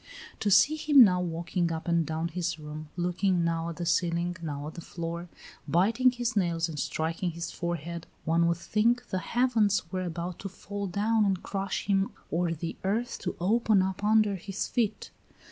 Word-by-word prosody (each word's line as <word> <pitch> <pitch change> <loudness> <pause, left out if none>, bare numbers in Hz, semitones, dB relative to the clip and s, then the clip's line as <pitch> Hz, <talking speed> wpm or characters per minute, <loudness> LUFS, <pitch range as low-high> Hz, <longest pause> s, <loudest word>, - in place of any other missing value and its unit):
To 210 - 0
see 240 +11 +5
him 295 -4 +7
now 180 -4 +3
walking 170 0 -1
up 160 +1 -4
and 170 -1 +3
down 160 +1 -2
his 175 0 -2
room, 155 0 -8
looking 180 +1 +1
now 165 0 -1
at 170 - -6
the 175 - -4
ceiling, 170 +1 +1
now 145 -3 -4
at 155 - -6
the 170 - -8
floor, 170 +1 -5 0.4
biting 210 - +4
his 245 -2 -2
nails 170 -4 +1
and 155 -3 -6
striking 165 +5 -1
his 170 +1 -5
forehead, 170 -1 -4 0.2
one 165 +1 +3
would 170 -1 +1
think 235 +7 +1
the 185 - -1
heavens 215 -6 +1
were 185 - -2
about 175 0 -4
to 195 - -5
fall 200 +1 -5
down 215 +4 +2
and 195 -3 0
crush 195 -1 -3
him 195 -1 +1 0.2
or 170 +1 +1
the 165 +1 -4
earth 220 +6 -1
to - - -3
open 210 +1 +3
up 190 +1 -3
under 210 -2 +3
his 195 +2 -4
feet. 220 -4 -1
180 Hz, 185 wpm, -28 LUFS, 170-205 Hz, 0.4 s, him